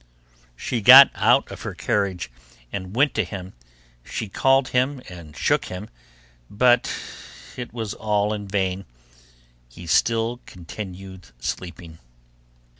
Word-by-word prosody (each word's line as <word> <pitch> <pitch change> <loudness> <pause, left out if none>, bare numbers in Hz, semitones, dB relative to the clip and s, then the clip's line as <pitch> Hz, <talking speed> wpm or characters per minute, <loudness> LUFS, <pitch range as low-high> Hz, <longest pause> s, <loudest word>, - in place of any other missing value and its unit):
She 115 - -3
got 130 +6 +10
out - - +2
of - - -9
her - - -6
carriage 95 -6 -2 0.4
and 95 +1 -6
went 140 +2 +3
to 110 - +1
him; 95 0 -8 0.5
she 105 - -5
called 135 +5 +2
him 130 +2 0
and 85 -4 -12
shook - - +1
him, 90 +4 -8 0.6
but 120 +3 +3 0.6
it 125 -1 -7
was 110 -3 -5
all 105 -1 0
in 105 -1 -6
vain, 95 -1 -2 0.8
he 85 +8 -12
still 115 +7 +1
continued 95 0 -9
sleeping. 85 +2 -6
100 Hz, 120 wpm, -23 LUFS, 90-120 Hz, 0.8 s, got